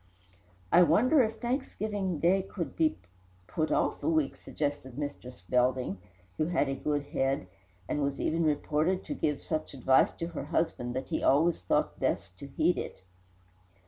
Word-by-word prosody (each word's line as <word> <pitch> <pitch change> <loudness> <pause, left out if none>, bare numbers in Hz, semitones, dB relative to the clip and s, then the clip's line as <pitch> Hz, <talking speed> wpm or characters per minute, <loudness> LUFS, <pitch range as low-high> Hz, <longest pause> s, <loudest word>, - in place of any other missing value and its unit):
"I 175 - +7
wonder 230 - +5
if 225 -1 0
Thanksgiving 215 - -2
Day 180 +5 +3
could 185 -3 -5
not - - -21
be 160 -1 +2 0.5
put 155 - -2
off - - +1
a - - 0
week," 155 -4 +1
suggested 145 -4 -4
Mistress 135 - -6
Belding, 125 -5 +1 0.4
who 155 - +1
had 170 -4 +1
a 135 - -1
good 145 +1 -1
head, 135 -5 -1 0.4
and 150 - -1
was 140 -1 -1
even 165 +1 +1
reported 155 +4 +1
to - - -3
give 150 - -1
such 155 -3 -3
advice 130 0 +4
to 165 - -5
her 170 - -5
husband 140 -6 -1
that 130 0 -4
he - - -1
always 160 +5 +3
thought 90 - 0
best 90 - -1
to 140 - -8
heed 175 +6 +1
it. - - -7
150 Hz, 170 wpm, -30 LUFS, 135-175 Hz, 0.5 s, I